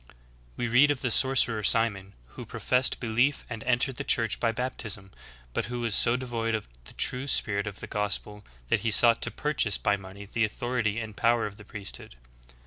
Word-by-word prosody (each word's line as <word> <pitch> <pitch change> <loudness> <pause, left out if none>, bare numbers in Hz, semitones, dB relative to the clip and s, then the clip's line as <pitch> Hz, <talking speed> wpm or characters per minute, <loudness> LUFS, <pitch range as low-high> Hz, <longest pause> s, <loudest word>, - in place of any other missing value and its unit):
We 120 - -1
read 125 +5 +5
of 145 -3 -1
the 125 - 0
sorcerer 125 -3 +3
Simon, 100 -3 +2 0.2
who - - -9
professed 125 0 0
belief 120 +5 0
and 115 -2 -5
entered 125 +1 +1
the - - -3
Church 115 -2 +1
by 115 - +1
bap 125 +3 -3
tism, 95 -2 -5 0.4
but - - -1
who 120 +2 -5
was 115 -3 -1
so 115 +3 +4
devoid 115 -3 -2
of 110 - -5 0.2
the - - -11
true 130 +2 +1
spirit 100 -6 +1
of 100 -1 -6
the - - -5
gospel 105 0 -3 0.3
that - - +2
he 115 - -1
sought 115 +2 +5
to - - 0
purchase 140 -9 0
by 100 0 +1
money 95 +1 -11
the 115 +3 -1
authority 115 0 -1
and 110 -2 -7
power 115 +1 +2
of 105 -1 -7
the 105 - -12
priesthood. 100 - -7
115 Hz, 200 wpm, -27 LUFS, 105-125 Hz, 0.4 s, read